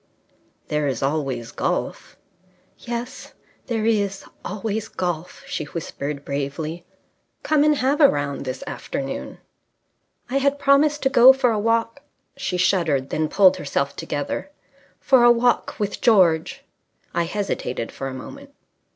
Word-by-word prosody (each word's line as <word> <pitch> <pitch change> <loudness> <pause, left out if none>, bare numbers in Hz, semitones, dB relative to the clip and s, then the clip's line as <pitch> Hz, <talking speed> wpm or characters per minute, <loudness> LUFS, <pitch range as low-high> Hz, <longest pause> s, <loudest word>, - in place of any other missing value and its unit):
"There 150 -1 0
is 130 -3 -2
always 135 -5 -2
golf." - - -3 0.6
"Yes, 240 +2 -6 0.3
there 225 -3 -1
is 200 -3 0 0.2
always 215 +2 -3
golf," 175 -3 -4
she - - -4
whispered 145 -2 -5
bravely. 145 +4 -4 0.6
"Come 305 -2 +3
and 300 0 +4
have 280 +3 +1
a 285 - +8
round 145 -1 -2
this 130 -1 -5
afternoon." 135 - -5 0.9
"I 260 - -1
had 280 +1 +2
promised 290 +2 +3
to 270 - +3
go 260 +1 +8
for 260 -2 +2
a 215 - 0
walk 230 +4 0 0.2
..." - - -48
She 195 -10 -3
shuddered, 165 -8 +1
then 155 0 0
pulled 190 -2 +5
herself 140 -2 -2
together. 145 - -4 0.3
"... 280 - -32
for 260 -3 +7
a 240 - +8
walk 240 +1 +1
with 205 -1 -3
George." 180 -8 +3 0.5
I 170 - +1
hesitated 165 - -3
for 135 - -5
a 135 - -5
moment. 280 - -10
195 Hz, 140 wpm, -22 LUFS, -, 0.9 s, a